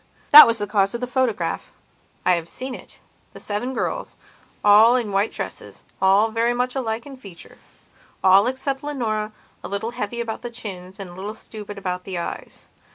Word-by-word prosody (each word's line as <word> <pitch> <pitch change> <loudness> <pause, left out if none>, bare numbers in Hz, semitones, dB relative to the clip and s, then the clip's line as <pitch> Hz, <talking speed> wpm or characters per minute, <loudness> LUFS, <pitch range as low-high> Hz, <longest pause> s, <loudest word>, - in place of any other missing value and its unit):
That 300 -2 +12
was 230 0 +2
the 205 - -1
cause 200 0 +1
of - - -3
the - - 0
photograph. 250 -3 -1 0.5
I 185 - +4
have 170 -2 0
seen 260 0 -5
it, - - -12 0.3
the - - -11
seven 230 +5 -3
girls, - - -3 0.5
all 215 +4 +7
in 235 -5 -1
white 200 +2 +1
dresses, - - -8 0.2
all 195 +4 +4
very 230 +2 +1
much 250 +1 -1
alike 230 -3 -3
in 280 -1 -10
featureall, 195 0 -1
except 270 +1 -3
Leonora, 220 -7 -2 0.3
a - - -5
little 205 +3 -3
heavy 235 -1 -4
about 230 -2 -4
the 240 - -5
chins 190 -4 -9
and 190 -3 -7
a - - -12
little 200 +4 -6
stupid 210 -2 -9
about 180 -2 -4
the 190 -2 -5
eyes. 170 - -7
220 Hz, 180 wpm, -22 LUFS, 195-245 Hz, 0.5 s, That